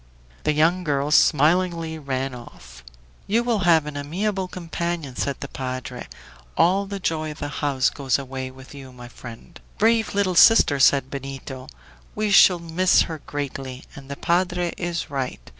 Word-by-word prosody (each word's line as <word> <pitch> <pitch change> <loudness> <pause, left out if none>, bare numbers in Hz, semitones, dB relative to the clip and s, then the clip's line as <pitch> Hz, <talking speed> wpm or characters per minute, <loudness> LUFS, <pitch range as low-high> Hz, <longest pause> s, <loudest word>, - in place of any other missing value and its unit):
The 150 - +2
young 165 +4 +2
girl 145 -2 -1
smilingly 165 +2 +2
ran 135 -2 -3
off. 65 - -13 0.4
"You 230 +4 +2
will 235 -3 0
have 160 -3 +5
an 150 -1 -7
amiable 185 +7 -2
companion," 170 -5 -4
said 140 +1 -3
the 140 - -4
padre. 130 -2 -6 0.5
"All 195 +4 +3
the 200 0 -5
joy 155 -3 -2
of - - -19
the 145 - -5
house 140 -4 +1
goes 135 -4 0
away 130 -1 -6
with 130 +1 -14
you, 135 -2 -11
my 125 -1 -11
friend." 120 +7 -12 0.2
"Brave 220 -4 +2
little 200 -2 +1
sister!" 170 -6 +6
said 135 0 +4
Benito, 135 -1 -7 0.5
"we 215 -1 -1
shall 185 -2 +7
miss 170 +2 +2
her 160 -2 -6
greatly, 135 -2 -5
and 140 -3 -12
the 140 - -4
padre 175 0 0
is 175 -4 -4
right. 135 - -3
150 Hz, 160 wpm, -23 LUFS, 135-175 Hz, 0.5 s, shall